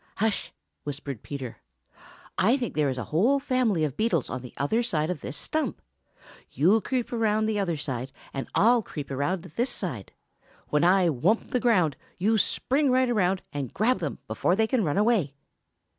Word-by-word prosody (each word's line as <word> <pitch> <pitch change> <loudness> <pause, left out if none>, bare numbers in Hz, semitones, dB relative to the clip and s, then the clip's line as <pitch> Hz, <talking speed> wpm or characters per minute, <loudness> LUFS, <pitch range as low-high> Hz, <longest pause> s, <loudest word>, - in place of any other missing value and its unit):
"Hush!" 220 0 -1 0.3
whispered 140 -4 -5
Peter. 135 -4 -6 0.8
"I 230 +8 +3
think 245 -4 -3
there 150 -2 +1
is 130 - -3
a 125 - -2
whole 240 - +4
family 250 -11 +1
of 145 -4 -1
beetles 190 - +1
on 130 +1 -3
the 125 - -9
other 145 - +1
side 160 -8 0
of 165 - -5
this 135 - -5
stump. 315 0 -2 0.7
You 190 +10 +4
creep 250 0 -2
around 220 -2 +2
the 215 -1 0
other 175 -5 0
side, 130 -2 -4 0.2
and 135 - -4
I'll 235 +3 +5
creep 145 -9 -7
around 150 +7 -1
this 240 +3 +1
side. 135 - -4 0.6
When 150 +1 +2
I 180 +1 +5
thump 165 - +1
the 250 - +2
ground, 185 - +2 0.2
you 215 +4 +2
spring 275 +7 +1
right 255 -1 +3
around 190 -4 +1
and 140 -4 -4
grab 230 +1 +2
them 155 -6 -3
before 110 +11 +1
they 220 +2 +3
can 235 0 +1
run 150 -1 0
away." 205 - +2
185 Hz, 180 wpm, -27 LUFS, 145-230 Hz, 0.8 s, I'll